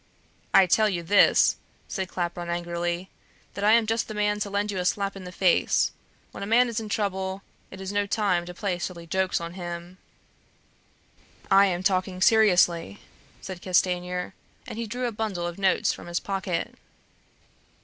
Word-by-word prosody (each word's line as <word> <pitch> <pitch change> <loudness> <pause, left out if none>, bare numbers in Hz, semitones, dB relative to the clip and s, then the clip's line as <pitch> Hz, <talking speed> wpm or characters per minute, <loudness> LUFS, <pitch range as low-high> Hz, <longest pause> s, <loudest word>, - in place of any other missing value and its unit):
"I 195 - +7
tell 215 +4 +3
you 175 -3 -3
this," 200 +5 +5 0.3
said 190 -2 -3
Claparon 175 -1 -4
angrily, 175 +1 -3 0.4
"that 200 - -5
I 210 +1 +5
am 230 -1 +5
just 225 +1 -1
the 215 - -7
man 210 0 0
to 205 - -2
lend 205 +1 -1
you 190 - -3
a - - -1
slap 200 +2 0
in 190 -1 -9
the 180 - -7
face. 185 -1 +2 0.4
When - - -9
a 200 - -4
man 240 +3 +4
is 230 - -2
in 220 -1 -7
trouble, 190 -2 -2 0.3
it 190 - -11
is 190 0 -5
no 205 0 0
time 195 -5 0
to 180 - -7
play 185 -2 -2
silly 175 -1 -5
jokes 190 +2 0
on 170 0 -6
him." 175 0 -7 1.5
"I 195 +1 +7
am 180 -1 -2
talking 185 -1 0
seriously," 180 - +3 0.4
said 185 -2 -7
Castanier, 180 -1 0 0.3
and 225 - -7
he 230 - -3
drew 250 +3 -3
a 240 - -1
bundle 210 -5 -3
of 175 +2 -5
notes 190 -1 +2
from - - -10
his 175 0 -1
pocket. 190 -3 -3
190 Hz, 180 wpm, -26 LUFS, 175-205 Hz, 1.5 s, I